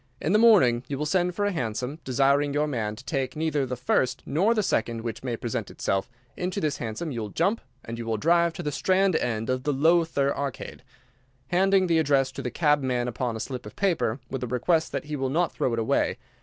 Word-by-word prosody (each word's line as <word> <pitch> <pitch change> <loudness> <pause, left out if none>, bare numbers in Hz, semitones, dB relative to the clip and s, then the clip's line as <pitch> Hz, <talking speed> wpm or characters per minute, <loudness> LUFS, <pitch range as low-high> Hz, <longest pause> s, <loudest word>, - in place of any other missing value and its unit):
In 160 - 0
the 210 - +5
morning 175 - +5
you 140 - -3
will 150 - -2
send 180 +2 +1
for 205 - 0
a 205 - +1
hansom, 125 - -3
desiring 140 +2 +2
your 150 +1 +2
man 115 -7 -2
to 125 - -13
take 130 -2 -2
neither 150 -3 0
the 125 - -3
first 130 +1 0
nor 195 +11 +2
the 215 - +1
second 115 - 0
which 115 -1 -5
may 120 -3 -2
present 120 -1 -3
itself. 95 +4 -2 0.3
Into 180 +2 -2
this 150 -6 -1
hansom 120 +8 -4
you 120 -3 -3
will 105 - -4
jump, 195 - 0 0.2
and 115 +1 -6
you 115 - -5
will 110 -1 0
drive 170 +7 +3
to - - -6
the 150 - -2
Strand 185 +3 +2
end 115 -5 -1
of 130 0 0
the 145 +3 0
Lowther 155 -1 +2
Arcade, 140 -3 -5 0.7
handing 190 +2 +3
the 165 -2 +3
address 140 -3 +2
to - - -6
the 125 - -3
cabman 130 -5 +1
upon 120 -1 -2
a - - -5
slip 125 +2 -5
of - - -11
paper, 170 - 0
with 135 0 -5
a - - -2
request 160 +7 +1
that - - -3
he 150 0 -4
will 135 -2 -1
not 170 +5 +1
throw 130 - -1
it 115 - -1
away. 115 +4 +1
140 Hz, 230 wpm, -26 LUFS, 125-165 Hz, 0.7 s, the